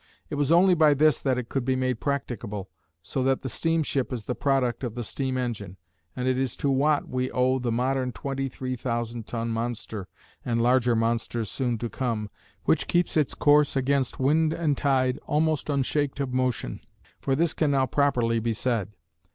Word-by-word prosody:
It - - -4
was 145 0 +1
only 180 +2 +6
by 155 -3 +5
this 155 +1 +3
that 130 -2 +1
it 125 -2 -3
could 135 0 -2
be 130 +1 +1
made 130 -2 -1
practicable, 115 - -3 0.3
so 130 - -3
that 135 0 +1
the 130 - -3
steamship 155 -4 0
is 120 -4 -4
the 125 - -1
product 130 -3 0
of 120 -3 -3
the 120 - -3
steam 130 +3 -3
engine, 110 -7 -4 0.4
and 125 0 -2
it 130 0 +2
is 130 -3 -2
to 140 - 0
Watt 145 +2 +2
we 130 0 -1
owe 130 +1 +2
the 120 -2 -1
modern 130 +2 0
twenty 135 +1 -3
three 130 0 -4
thousand 120 -2 -3
ton 115 -1 -3
monster 115 -3 -3 0.4
(and 115 -2 0
larger 120 0 +3
monsters 115 -1 -1
soon 125 -3 -1
to 120 - -3
come), 115 -4 -3 0.3
which - - +2
keeps 175 0 +1
its 150 -4 +1
course 145 -1 +4
against 135 -1 0
wind 155 +4 +3
and 160 -4 0
tide, 130 -2 +1
almost 155 0 +1
"unshaked 145 0 0
of 135 -2 -2
motion," 130 -2 -1 0.4
for 135 - 0
this 165 +3 +2
can 155 - +1
now 135 -2 +3
properly 125 -5 +1
be 115 +1 -1
said. 105 -3 -1
130 Hz, 190 wpm, -26 LUFS, 120-140 Hz, 0.4 s, only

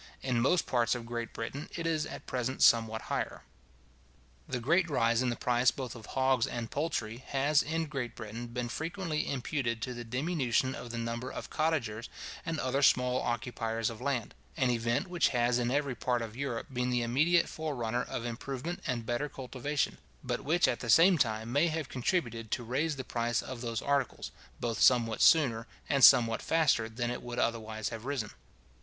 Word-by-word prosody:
In 125 -3 +1
most 165 +8 +3
parts 120 -2 +1
of 120 -1 -6
Great 120 0 -4
Britain 135 +6 -5
it 170 - -4
is 155 -2 0
at - - -8
present 130 0 -1
somewhat 110 -2 +4
higher. - - -3 1.0
The 125 - -2
great 170 +8 +2
rise 115 -4 +2
in 130 - +1
the 120 - -1
price 125 +1 +3
both 130 0 -5
of 110 -3 -11
hogs 130 -2 +2
and 115 -2 -5
poultry, 120 -7 -2
has, 140 +2 +3
in 160 +1 -1
Great 135 -6 -4
Britain, 115 +2 -6
been 120 +1 -3
frequently 160 +4 -3
imputed 125 -3 -2
to 125 - -3
the 120 0 -6
diminution 130 0 0
of 120 - -7
the 115 - -5
number 115 +2 -3
of - - -7
cottagers 125 -9 -1 0.3
and 165 -2 -3
other 130 +2 0
small 125 -2 +4
occupiers 115 -2 -2
of 110 - -10
land; 130 -6 -2 0.2
an 130 -2 +2
event 120 - 0
which 175 -1 +2
has 120 0 +2
in 120 0 0
every 140 0 0
part 120 -1 -1
of 110 -1 -7
Europe 130 -1 -4
been 125 0 0
the 120 -1 +1
immediate 155 +9 +3
forerunner 125 -7 -2
of 120 - -4
improvement 135 +8 -4
and 120 -3 -2
better 120 +5 -1
cultivation, 135 +2 -3 0.2
but - - -2
which 170 +5 +3
at 120 - 0
the 120 - -6
same 170 - +6
time 110 -1 0
may 145 +6 +3
have 155 -3 -3
contributed 120 - -1
to 120 - -2
raise 145 +7 -1
the 130 - -5
price 120 -1 -1
of 130 -2 -7
those 115 -2 -3
articles, 140 -3 -1 0.3
both 115 -2 -2
somewhat 115 -3 +4
sooner 125 -8 +5 0.2
and 140 -2 +2
somewhat 115 -1 +7
faster 150 -9 +2
than 120 +1 -2
it 125 - -4
would 120 0 -6
otherwise 110 -2 -1
have 115 -1 -7
risen. 130 -6 -2
125 Hz, 185 wpm, -31 LUFS, 115-140 Hz, 1.0 s, somewhat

